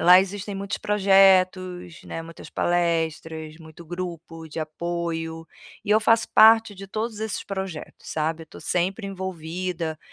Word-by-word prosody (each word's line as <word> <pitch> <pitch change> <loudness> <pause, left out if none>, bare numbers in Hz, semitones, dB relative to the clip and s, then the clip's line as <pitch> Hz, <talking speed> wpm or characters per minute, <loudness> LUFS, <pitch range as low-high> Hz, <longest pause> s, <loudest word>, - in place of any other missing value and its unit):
lá 180 +1 +8
existem 200 +1 -4
muitos 200 0 -3
projetos, 185 -3 +3
né, 165 - -5
muitas 165 0 -11
palestras, 160 -2 -1
muito 160 +1 -13
grupo 170 -2 -6
de 160 - -5
apoio, 165 0 -4 0.4
e 205 - -3
eu 215 - +6
faço 225 +1 +3
parte 225 -1 +7
de 195 0 -9
todos 215 +2 -4
esses 220 -2 -2
projetos, 190 -5 -6
sabe. 160 +1 -2
Eu - - -36
tô - - -13
sempre 190 +4 -1
envolvida 180 -3 -4
180 Hz, 140 wpm, -24 LUFS, 165-195 Hz, 0.4 s, lá